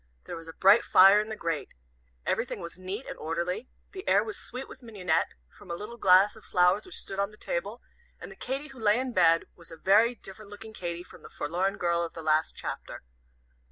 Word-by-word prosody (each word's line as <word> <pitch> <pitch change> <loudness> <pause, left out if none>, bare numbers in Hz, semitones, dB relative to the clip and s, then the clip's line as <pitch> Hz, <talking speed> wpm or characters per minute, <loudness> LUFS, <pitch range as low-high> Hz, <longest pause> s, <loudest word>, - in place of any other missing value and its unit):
There - - -7
was 165 0 -10
a 165 - -8
bright 200 +7 +6
fire 195 +3 +7
in 215 - -6
the 220 - -4
grate. 165 -7 -3 0.5
Everything 230 -2 -1
was 170 -2 -7
neat 190 +7 -5
and - - -8
orderly, 170 +8 -3 0.2
the 380 +1 -9
air - - +5
was 425 - -5
sweet 255 +2 -6
with - - -12
mignonette, 185 -9 -1 0.2
from - - -16
a 170 - -2
little 215 +6 -8
glass 195 0 +5
of 220 - -15
flowers 180 - +2
which 370 - -4
stood 195 - -4
on 200 0 +1
the 210 - -17
table, - - -4 0.4
and - - -9
the - - -11
Katy 275 +3 -4
who 270 -2 -13
lay 215 0 +3
in 255 -1 -3
bed, 165 -3 +4
was 170 -2 -15
a 165 - -10
very 215 +8 +4
different 200 -1 -12
looking 220 +2 -9
Katy 175 -3 -5
from - - -15
the - - -12
forlorn 180 +6 -2
girl 170 -1 +1
of 170 - -5
the 165 - -8
last 155 0 +2
chapter. - - -6
195 Hz, 225 wpm, -28 LUFS, 170-225 Hz, 0.5 s, fire